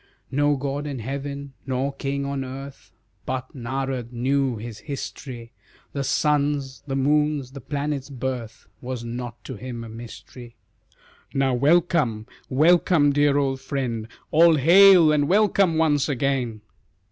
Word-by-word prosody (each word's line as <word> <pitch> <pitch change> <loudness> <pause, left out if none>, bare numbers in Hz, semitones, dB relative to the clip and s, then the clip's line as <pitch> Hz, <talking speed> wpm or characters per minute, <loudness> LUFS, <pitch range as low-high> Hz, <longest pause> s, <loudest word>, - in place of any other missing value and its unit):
No 145 +2 +2
god 140 +2 -3
in 140 -2 -4
heaven, 140 +3 -5
nor 135 +2 -1
king 140 0 -3
on 140 -1 -3
earth, 135 +1 -9 0.4
But 130 0 -4
Narad 130 -1 -3
knew 130 +1 0
his 110 0 -8
history, 130 -4 -7 0.4
The 140 - -2
sun's, 145 -1 0
the 135 - -2
moon's, 145 -1 +1
the 140 0 -9
planets' 145 0 -3
birth 125 -3 -5 0.2
Was 125 -1 -5
not 120 0 -6
to - - -7
him 120 -2 -6
a 115 - -9
mystery. 120 +1 -11 0.8
"Now 135 -1 +2
welcome, 140 -5 +2 0.2
welcome, 155 0 +4
dear 145 0 +3
old 135 -2 0
friend, 120 -6 -3 0.2
All 165 +1 +6
hail, 175 +2 +7
and 145 -1 +2
welcome 195 -3 +3
once 150 -3 +2
again!" 130 -5 -1
135 Hz, 135 wpm, -24 LUFS, 125-145 Hz, 0.8 s, hail